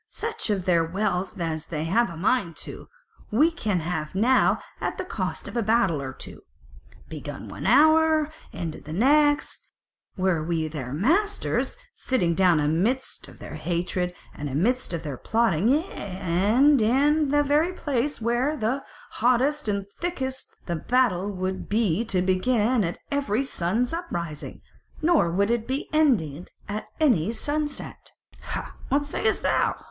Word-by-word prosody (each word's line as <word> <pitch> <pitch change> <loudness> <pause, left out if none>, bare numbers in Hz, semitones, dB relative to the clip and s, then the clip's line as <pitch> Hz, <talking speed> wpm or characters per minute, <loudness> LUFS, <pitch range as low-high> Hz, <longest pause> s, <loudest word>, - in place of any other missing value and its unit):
"Such 455 - -3
of 195 -4 0
their 170 -3 +3
wealth 190 +2 -2
as 160 -2 -3
we 155 -2 -2
have 220 +6 +2
a 170 - -8
mind 185 -2 +1
to, - - -9 0.4
we 300 +10 +4
can 210 - -1
have 160 -1 -3
now 240 +7 +4 0.2
at - - -2
the - - -4
cost - - -4
of - - -8
a 235 - +2
battle 205 -8 +2
or 135 -1 -4
two, - - -8 0.7
begun - - -7
one - - -5
hour 315 0 +5 0.2
and - - -8
ended - - -13
the 155 - -6
next: 290 - +2 0.5
were 185 -4 +1
we 160 -1 -1
their 140 -5 -6
masters 330 - +1 0.2
sitting 180 -11 0
down 175 -2 +4
amidst 180 - 0
of - - -14
their - - -9
hatred, 180 +1 -2 0.2
and 145 0 -5
amidst 220 - 0
of 170 -2 -3
their 145 -4 -5
plotting, 220 - +1
yea, 295 +5 +3
and 200 - +2
in 285 +6 +3
the 290 +1 +3
very 300 +5 +2
place 290 -5 -2
where 240 +6 0
that 215 - -1
were 255 +4 +1
the - - -17 0.3
hottest 255 +4 +2
and 200 -1 -1
thickest, 265 -7 -4
the 170 - -2
battle 205 -2 +1
would 185 0 -4
be 215 -2 +1
to 185 -5 +1
begin 215 +5 +2
at 170 -1 -2
every 275 -3 0
sun's 230 - -1
uprising, 170 - -5 0.4
nor 310 - +3
would 200 +5 +1
it 235 -1 -1
be 265 +3 -2
ended 185 - +2 0.2
at 215 +1 -4
any 225 - +3
sunset. 295 +4 -4 0.3
Hah! - - -5 0.2
what 285 +1 +2
sayest 290 - -1
thou?" - - +2
215 Hz, 160 wpm, -25 LUFS, 175-275 Hz, 0.7 s, hour